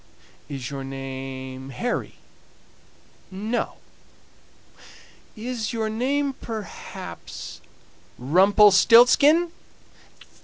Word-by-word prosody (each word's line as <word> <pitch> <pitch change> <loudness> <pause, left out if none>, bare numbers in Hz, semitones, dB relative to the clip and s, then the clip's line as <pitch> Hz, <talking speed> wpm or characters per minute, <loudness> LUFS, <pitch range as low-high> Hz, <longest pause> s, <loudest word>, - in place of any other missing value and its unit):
"Is 135 -3 -6
your 135 -1 -5
name 135 0 -7
Harry?" 235 - -3 1.1
"No." 210 +5 -3 1.6
"Is 235 0 -4
your 220 -1 -2
name 275 +5 0
perhaps, 220 -6 -8 0.6
Rumpelstiltzkin?" 215 - +6
210 Hz, 60 wpm, -24 LUFS, -, 1.6 s, Rumpelstiltzkin